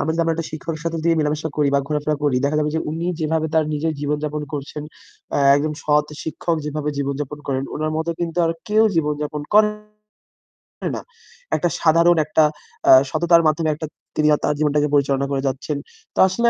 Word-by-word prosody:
আমরা 160 - 0
যদি 165 - 0
আমরা 165 -1 +1
একটা 165 -1 -4
শিক্ষকের 155 0 -5
সাথে 165 0 -1
যদি 165 - 0
মেলামেশা 150 +1 -1
করি 150 -2 +2
বা - - +5
ঘোরাফেরা 150 0 0
করি, 140 -3 +2
দেখা 145 +2 +1
যাবে 150 0 0
যে 160 - +1
উনি 165 +2 -3
যেভাবে 160 0 0
তার 160 -1 +4
নিজের 160 +2 -1
জীবনযাপন 150 +1 -2
করছেন, 145 +1 -5 0.5
অ্যা - - +1 0.2
একজন 150 +2 -1
সৎ 150 0 +3 0.2
শিক্ষক 165 +1 -2
যেভাবে 150 0 -3
জীবনযাপন 140 +1 -3
করেন, 135 -1 -1
উনার 155 +1 -2
মতো 160 +1 -1
কিন্তু 170 0 -2
আর - - +1 0.2
কেউ 215 +1 +4
জীবনযাপন 150 -1 -1
করে 210 0 +7 1.3
না। - - -5 0.5
একটা 175 - +1
সাধারণ 170 +1 +5
একটা 155 +1 +3 0.5
আ - - +10 0.2
সততার 170 +2 +4
মাধ্যমে 155 +1 +1
একটা 155 +1 -5 0.3
তিনি 150 0 +2
আ - - -3
তার - - +2
জীবনটাকে 150 -1 +2
পরিচালনা 140 -1 +2
করে 135 -1 0
যাচ্ছেন। 135 +2 -2 0.4
তো - - -4
আসলে 235 +6 +2
155 Hz, 190 wpm, -21 LUFS, 150-165 Hz, 1.3 s, আ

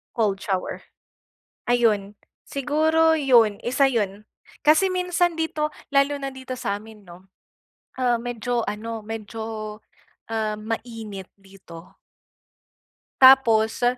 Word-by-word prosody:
Cold 205 -4 0
shower. 190 -2 -3 0.9
Ayun 210 -4 +1 0.3
siguro 315 +3 +2
yun, 240 -8 +4
isa 265 +3 +3
yun. 210 -4 -2 0.4
Kasi 315 +6 +5
minsan 360 -1 0
dito, 305 -1 -1 0.2
lalo 275 +1 +3
na 275 - -4
dito 260 -1 -7
sa'min, 210 0 -5
'no? 180 +2 -15 0.7
Ah, 245 -2 +2
medyo 240 0 -2
ano, 225 +1 -5
medyo, 220 -1 -6 0.5
ah, 215 -1 -1
mainit 220 -3 -6
dito. 190 -3 -14 1.3
Tapos, 245 -4 +5
225 Hz, 100 wpm, -23 LUFS, 210-270 Hz, 1.3 s, Kasi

